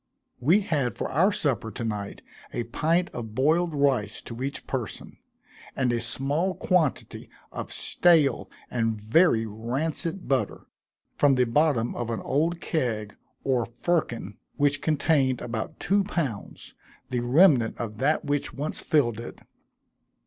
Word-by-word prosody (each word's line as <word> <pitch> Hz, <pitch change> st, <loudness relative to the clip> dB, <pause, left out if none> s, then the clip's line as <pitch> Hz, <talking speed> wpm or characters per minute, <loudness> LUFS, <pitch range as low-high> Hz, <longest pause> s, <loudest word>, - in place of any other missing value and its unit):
We 165 Hz, -, +4 dB
had 145 Hz, -, -1 dB
for -, -, -3 dB
our 185 Hz, +9 st, +4 dB
supper 140 Hz, -, -1 dB
to 120 Hz, -, -6 dB
night, 105 Hz, -3 st, -4 dB, 0.3 s
a 120 Hz, -, -2 dB
pint 165 Hz, +9 st, 0 dB
of 110 Hz, -3 st, -7 dB
boiled 160 Hz, +5 st, +2 dB
rice 130 Hz, -7 st, +1 dB
to 115 Hz, +1 st, -8 dB
each 140 Hz, +2 st, -3 dB
person, 125 Hz, -5 st, -5 dB, 0.6 s
and 125 Hz, -2 st, +1 dB
a 120 Hz, -, 0 dB
small 140 Hz, +10 st, -1 dB
quantity 175 Hz, -7 st, 0 dB, 0.2 s
of -, -, -6 dB
stale 165 Hz, -5 st, +3 dB, 0.2 s
and 115 Hz, -2 st, 0 dB
very 115 Hz, -, +3 dB
rancid 145 Hz, -, -3 dB
butter, 135 Hz, -1 st, -1 dB, 0.5 s
from 145 Hz, -2 st, +4 dB
the 125 Hz, -, +3 dB
bottom 125 Hz, -2 st, +2 dB
of 120 Hz, -1 st, -4 dB
an 115 Hz, -, -2 dB
old 165 Hz, +5 st, 0 dB
keg, 115 Hz, -12 st, -2 dB, 0.3 s
or 130 Hz, -3 st, +1 dB
firkin, 120 Hz, -, -2 dB, 0.2 s
which 145 Hz, -1 st, +1 dB
contained 140 Hz, -4 st, +2 dB
about 115 Hz, -2 st, -5 dB
two 200 Hz, +1 st, +2 dB
pounds, 150 Hz, -, -4 dB, 0.4 s
the 125 Hz, -, 0 dB
remnant 125 Hz, -1 st, +4 dB
of 110 Hz, -2 st, -5 dB
that 150 Hz, +4 st, +1 dB
which 145 Hz, 0 st, -2 dB
once 145 Hz, +3 st, -3 dB
filled 120 Hz, -8 st, +1 dB
it. 120 Hz, -, -9 dB
135 Hz, 140 wpm, -26 LUFS, 115-160 Hz, 0.6 s, We